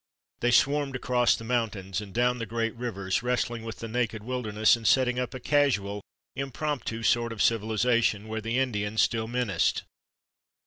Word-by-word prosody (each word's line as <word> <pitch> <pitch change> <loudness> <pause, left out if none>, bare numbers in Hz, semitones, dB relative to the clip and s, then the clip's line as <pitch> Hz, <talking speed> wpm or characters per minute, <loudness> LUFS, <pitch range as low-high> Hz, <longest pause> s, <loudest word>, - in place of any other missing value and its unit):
They 120 - +1
swarmed 140 +2 +2
across 125 -1 +2
the - - -8
mountains 105 -5 -2
and 100 -2 -9
down 125 +3 +1
the 115 - -4
great 115 +1 -1
rivers, 100 -5 -2
wrestling 120 -1 -1
with 115 0 -7
the 115 - -6
naked 110 -2 -2
wilderness 110 -3 +2
and 115 -2 -3
setting 125 -1 +3
up 125 0 -3
a - - -5
casual, 120 -8 +1 0.3
impromptu 135 -4 -3
sort 115 0 +2
of 115 - -7
civilization 110 -1 +1
where 110 0 -4
the 115 +3 -2
Indian 110 -5 -1
still 110 0 +2
menaced. 120 -7 0
115 Hz, 165 wpm, -27 LUFS, 110-125 Hz, 0.3 s, setting